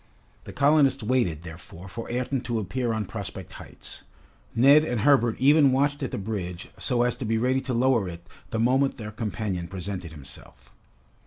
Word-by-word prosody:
The - - -8
colonists 145 -3 +3
waited, 105 -10 0
therefore, 85 +2 -10
for 115 +5 -7
Ayrton 125 +2 -1
to 120 -2 -1
appear 115 +4 -2
on 110 -1 -1
Prospect - - -7
Heights. - - -10 0.5
Neb 140 +6 +7
and 120 -7 -1
Herbert 125 -4 +4
even 140 +1 +5
watched 140 +2 +1
at 135 - -2
the - - -4
bridge 95 -4 -5
so 120 -3 +1
as 120 -1 +1
to - - -5
be 110 0 0
ready 130 +3 +1
to 130 -1 -3
lower 120 -5 +2
it 85 0 -10 0.2
the 115 - -3
moment 130 +4 +2
their 105 -3 -6
companion 105 -5 -3
presented 90 -1 -6
himself. 70 -3 -11
115 Hz, 175 wpm, -26 LUFS, 95-130 Hz, 0.5 s, Neb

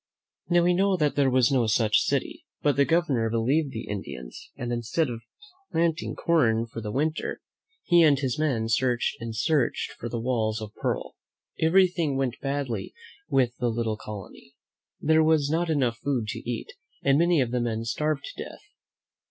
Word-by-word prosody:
Now, 175 -1 +4
we 180 +1 +4
know 190 +1 +2
that 150 -3 +1
there 140 -2 +3
was 130 -1 +3
no 125 -4 +2
such 110 0 +3
city; - - -2 0.2
but 145 -1 +3
the 140 - +4
Governor 145 -9 +1
believed 135 +6 +1
the 110 - -6
Indians, 70 -12 -7
and 120 0 -3
instead 120 +5 -1
of 115 -1 -6 0.5
planting 165 0 0
corn 115 -9 +2
for 115 0 -8
the 105 -1 -4
winter, 155 +6 -1 0.4
he 175 -1 +5
and 150 -4 +5
his 135 -1 -2
men 130 -8 0
searched 120 +2 +1
and 115 -1 -5
searched 140 +2 0
for 120 - -7
the 120 - -3
walls 115 -2 0
of 110 -1 -8
pearl. - - -3 0.4
Everything 170 -4 +3
went 130 -2 -1
badly 135 -3 -3 0.3
with 125 -2 +2
the 120 - 0
little 115 -1 -1
colony. 105 +6 -10 0.4
There 160 +1 +4
was 155 -2 +3
not 165 +1 0
enough 130 -7 +1
food 130 -5 -1
to - - -4
eat, 120 -2 -4 0.3
and 140 +1 +4
many 170 -1 +3
of 125 -3 +1
the 125 -1 0
men 115 -1 -2
starved 150 +6 -1
to - - -6
death. - - -12
130 Hz, 175 wpm, -26 LUFS, 115-155 Hz, 0.5 s, he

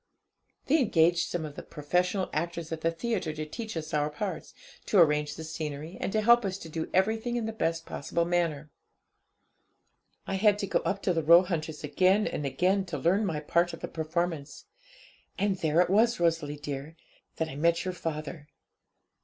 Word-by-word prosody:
'They 315 +4 +3
engaged 170 - +3
some 170 -3 -3
of 150 - -7
the - - -6
professional 180 +6 -1
actors 170 +1 -3
at 160 -1 -4
the 165 - +2
theatre 165 -2 -2
to 155 0 -4
teach 220 +4 -6
us 155 -1 -5
our 150 0 +1
parts, 185 +6 -5 0.3
to 210 - +2
arrange 150 -3 +4
the 160 - -7
scenery, 155 +1 -5
and - - -1
to 215 - +1
help 235 +2 +6
us 190 -1 -2
to 170 - -10
do 160 0 -4
everything 220 +5 +1
in 235 -2 -1
the 220 - -3
best 165 -6 -1
possible 170 +4 -2
manner. 165 -4 -1 1.5
I 195 - -2
had 205 +1 +4
to 205 - -2
go 195 - +1
up 195 0 -2
to 180 - +2
the 165 - 0
Roehunters' 165 -1 +3
again 185 +8 +3
and 145 - -2
again 185 +7 +1
to 170 -4 -4
learn 190 +9 +2
my 155 -4 -2
part 170 +3 +1
of - - -8
the - - -3
performance. 160 -2 -3 0.7
And 200 -1 +1
there 160 0 +2
it 180 - +1
was, 230 +2 +3
Rosalie 165 -4 +1
dear, 145 +1 -6 0.4
that 160 - -1
I 135 - -8
met 170 +4 +1
your 185 - -2
father. 155 -2 -5
170 Hz, 185 wpm, -28 LUFS, 155-190 Hz, 1.5 s, help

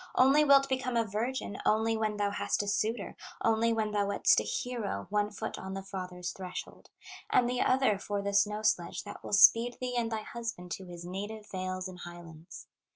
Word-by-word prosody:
Only 270 +4 +6
wilt 275 -1 +6
become 255 -2 -1
a 230 - +3
virgin, 220 +1 -3
Only 220 +1 +2
when 215 -1 -1
thou 205 -1 0
hast 205 - -1
a - - -6
suitor, 215 +1 -1 0.3
Only 225 +1 +3
when 220 -2 0
thou 205 -1 +1
wedst 200 - +4
a - - -2
hero, 225 - -3
One 210 0 +1
foot 205 - -5
on 190 0 -6
the 195 - -5
father's 180 -2 -5
threshold, 185 -2 -8 0.4
And 245 - +4
the 250 0 0
other 255 -6 +3
for 205 0 -3
the 200 0 -2
snow 210 +1 +2
sledge 175 -5 0
That - - -10
will - - -7
speed 230 +4 +6
thee 250 -1 -3
and 230 -1 0
thy 220 -1 -2
husband 230 -8 -6
To 190 - -5
his 175 -1 -9
native 205 +4 -6
vales 185 0 -3
and 185 -1 -10
highlands! 175 -1 -10
210 Hz, 200 wpm, -31 LUFS, 190-230 Hz, 0.4 s, Only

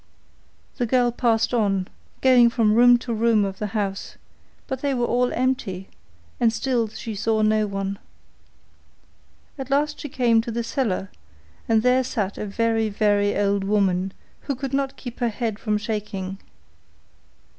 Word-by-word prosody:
The 245 -3 0
girl 245 0 +3
passed 230 -1 +1
on, 195 -5 +1 0.3
going 250 -2 +6
from 225 -3 +2
room 245 +2 +7
to 240 0 -5
room 225 -2 +3
of 195 -1 -5
the 210 - -2
house, 195 -2 -3 0.5
but 265 -1 -5
they 280 -2 0
were 240 -1 +1
all 245 +1 +1
empty, 220 -7 -2 0.5
and 230 - +3
still 235 -1 0
she 220 +1 -7
saw 220 +1 0
no 215 0 +2
one. 195 0 -4 1.6
At 265 -1 -5
last 295 +2 +1
she 295 - -6
came 235 -3 +3
to 235 - -7
the 235 +1 -2
cellar, 215 -6 -2 0.6
and 220 -1 +3
there 250 +1 +4
sat 210 -6 -3
a 210 - -3
very, 225 +1 0
very 205 -1 +1
old 200 -1 +1
woman, 195 -2 +1 0.3
who 280 - -4
could 270 +1 -5
not 275 -1 -1
keep 245 -2 -8
her 240 -2 +1
head 220 -1 -3
from 210 -2 0
shaking. 205 -3 -4
225 Hz, 155 wpm, -23 LUFS, 205-245 Hz, 1.6 s, room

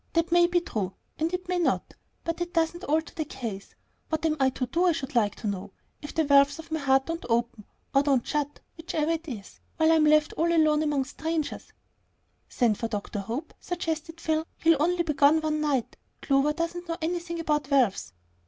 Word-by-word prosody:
That 335 0 +1
may 345 0 +6
be 350 0 +2
true, 200 - -3 0.2
and 320 +2 0
it 365 0 -4
may 360 0 0
not; 345 - 0 0.3
but 335 +1 -3
it 345 0 -4
doesn't 335 +2 +1
alter 315 +3 0
the 315 - -2
case. 230 -9 -7 0.3
What 315 0 -1
am 310 -1 +2
I 265 -1 +4
to 255 0 -3
do, 340 +8 +1
I 350 - +4
should 270 -4 -5
like 210 -4 +2
to 220 - -5
know, 200 0 -4 0.3
if 295 - -8
the 320 - +3
valves 280 0 +5
of 325 0 -11
my 315 - 0
heart 270 -1 +3
don't 330 0 -4
open, 235 -2 0 0.3
or 275 - +5
don't 275 -4 +2
shut 295 -1 -2 0.2
whichever 325 -1 -1
it 330 0 -3
is 215 -8 -8 0.2
while 320 0 +4
I'm 320 -1 +5
left 305 0 +4
all 330 - +1
alone 310 -2 +4
here 310 - 0
among 290 -3 +1
strangers?" 320 +2 -4 0.8
"Send 230 -4 +1
for 230 - -1
Dr. 210 -2 -4
Hope," 235 +10 -5
suggested 330 -2 -4
Phil. 315 -1 0
"He'll 325 -3 +3
only 350 +2 +2
be 310 -3 -1
gone 290 +3 +5
one 305 -1 -1
night. 280 -6 -1 0.3
Clover 275 +1 +3
doesn't 340 +2 -4
know 330 - -2
anything 340 +1 -3
about 300 -3 0
valves." 255 -9 +2
305 Hz, 210 wpm, -27 LUFS, 270-330 Hz, 0.8 s, may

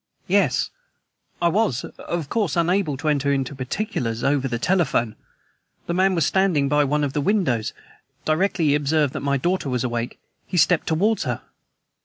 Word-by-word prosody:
"Yes; - - +2 0.7
I - - +5
was, 180 - +1
of 170 -4 -5
course, 200 - 0
unable 170 -3 +1
to 155 +3 -4
enter 140 -1 +2
into 135 -1 -1
particulars 130 - -3
over 140 -1 +2
the 120 -2 -2
telephone. 135 - +1 0.7
The 170 - -2
man 190 +1 +3
was 165 -4 +2
standing 180 -7 +2
by 150 +1 +3
one 150 +2 0
of 140 -2 -1
the 145 - 0
windows. 140 - +1 0.5
Directly 165 +2 +1
he - - +4
observed 150 -1 +1
that - - -3
my 140 0 0
daughter 175 +1 -1
was 125 -2 -1
awake, 120 -1 -3 0.3
he 180 - -3
stepped 175 0 +3
towards 190 +4 +1
her." 125 -3 -3
150 Hz, 170 wpm, -23 LUFS, 135-180 Hz, 0.7 s, I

